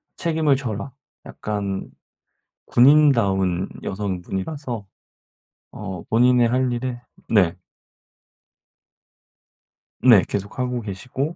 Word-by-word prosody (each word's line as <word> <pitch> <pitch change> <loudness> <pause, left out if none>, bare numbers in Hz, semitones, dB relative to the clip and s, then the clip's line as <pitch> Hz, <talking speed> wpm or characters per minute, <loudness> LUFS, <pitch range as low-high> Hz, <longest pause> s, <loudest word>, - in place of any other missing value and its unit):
책임을 160 -4 +1
져라." 125 0 -5 0.3
약간 100 -2 -4 0.8
군인다운 115 -10 +4 0.2
여성분이라서 100 - -4 0.9
어 95 -5 -7
본인의 120 +1 +4
할 125 +1 +1
일에 120 0 -4 0.3
네. 90 -6 +3 2.4
네. 115 -5 +7
계속 100 +4 -4
하고 125 -1 -1
계시고 125 - -4
120 Hz, 175 characters per minute, -22 LUFS, 100-130 Hz, 2.4 s, 네